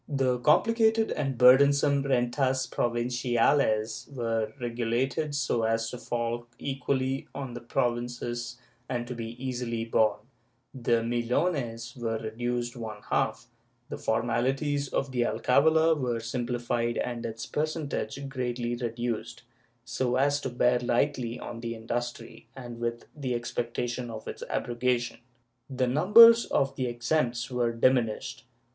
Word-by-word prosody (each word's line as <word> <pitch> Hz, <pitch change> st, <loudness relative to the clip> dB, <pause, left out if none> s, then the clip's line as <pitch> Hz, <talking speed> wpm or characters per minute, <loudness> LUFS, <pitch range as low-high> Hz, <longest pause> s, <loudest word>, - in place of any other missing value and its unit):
The 130 Hz, -3 st, +1 dB
comphcated 220 Hz, -, +3 dB
and 135 Hz, -4 st, -2 dB
burdensome 140 Hz, +3 st, +6 dB
Rentas 130 Hz, 0 st, +1 dB
Provinciates 120 Hz, -1 st, +1 dB
were 115 Hz, -5 st, -2 dB
regulated 120 Hz, +5 st, -1 dB
so 135 Hz, -5 st, 0 dB
as 115 Hz, 0 st, 0 dB
to 125 Hz, -, -7 dB
fall 120 Hz, 0 st, -3 dB
equally 135 Hz, -1 st, -2 dB
on 135 Hz, -3 st, -5 dB
the 120 Hz, -, -6 dB
various 120 Hz, -, -21 dB
provinces 120 Hz, -1 st, -2 dB, 0.3 s
and 120 Hz, -1 st, -2 dB
to 125 Hz, -, -5 dB
be 115 Hz, -2 st, -5 dB
easily 125 Hz, -3 st, -3 dB
borne; 110 Hz, -2 st, +2 dB, 0.5 s
the 120 Hz, -3 st, +1 dB
Millones 120 Hz, 0 st, -1 dB
were 115 Hz, -3 st, -2 dB
reduced 120 Hz, +2 st, -3 dB
one 110 Hz, -3 st, -7 dB
half; -, -, 0 dB, 0.4 s
the -, -, -5 dB
formalities 135 Hz, +6 st, 0 dB
of 135 Hz, 0 st, -1 dB
the 125 Hz, -2 st, 0 dB
alcavala 160 Hz, +7 st, +3 dB
were 125 Hz, -6 st, -1 dB
simplified 120 Hz, 0 st, -2 dB
and 120 Hz, -1 st, -3 dB
its 115 Hz, -1 st, -5 dB
per 150 Hz, -, 0 dB
centage 140 Hz, -4 st, -4 dB
greatly 120 Hz, -2 st, -2 dB
reduced, 120 Hz, -1 st, -4 dB, 0.4 s
so 125 Hz, 0 st, -1 dB
as 145 Hz, +2 st, +2 dB
to 130 Hz, -, -3 dB
bear 125 Hz, 0 st, +2 dB
lightly 120 Hz, 0 st, 0 dB
on 115 Hz, -1 st, -7 dB
industry, 115 Hz, 0 st, -5 dB
and 120 Hz, -3 st, -8 dB
with 120 Hz, 0 st, -3 dB
the 130 Hz, -4 st, -2 dB
expectation 120 Hz, +1 st, -3 dB
of 110 Hz, -1 st, -8 dB
its -, -, -7 dB
abrogation. 120 Hz, 0 st, -1 dB, 0.5 s
The 130 Hz, -1 st, 0 dB
numbers 220 Hz, -, +7 dB
of 135 Hz, 0 st, 0 dB
the 130 Hz, -2 st, -1 dB
exempts 120 Hz, 0 st, -1 dB
were 120 Hz, -1 st, +1 dB
diminished. 115 Hz, -1 st, 0 dB
120 Hz, 130 wpm, -28 LUFS, 120-135 Hz, 0.5 s, numbers